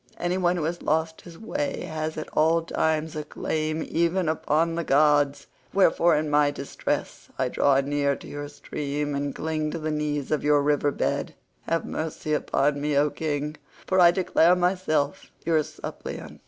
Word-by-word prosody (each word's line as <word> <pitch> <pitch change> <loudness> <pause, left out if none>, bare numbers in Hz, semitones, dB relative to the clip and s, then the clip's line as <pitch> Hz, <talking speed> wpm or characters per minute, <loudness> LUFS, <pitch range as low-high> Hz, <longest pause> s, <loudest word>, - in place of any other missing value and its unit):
Any 175 +2 -1
one 175 -1 +2
who 170 - -2
has 170 +3 -2
lost 160 +1 0
his 170 -2 -12
way 285 - -3
has 155 0 -4
at 155 - -4
all 165 +2 +3
times 160 -1 -1
a 155 - -3
claim 155 +1 -2
even 170 +1 +1
upon 160 +1 +1
the 170 0 -2
gods, 145 -1 +3 0.3
wherefore 170 -3 +4
in 155 +1 0
my 150 -1 +3
distress 145 -1 -4
I - - 0
draw 140 -1 +3
near 140 0 0
to - - -12
your 145 0 -6
stream, 145 0 -4
and 140 0 -2
cling 155 -1 -2
to 165 - -4
the 155 -1 -3
knees 150 -2 -2
of 155 - +1
your 145 -1 +4
riverhood. 145 0 0 0.3
Have 165 -1 0
mercy 155 -1 -3
upon 145 -1 +1
me, 145 -1 0
O 145 +1 +3
king, 150 -1 -3 0.3
for 185 - +2
I 175 -1 +8
declare 175 -1 +3
myself 175 -5 0 0.2
your 160 -1 +3
suppliant." - - -8
155 Hz, 170 wpm, -25 LUFS, 145-165 Hz, 0.3 s, I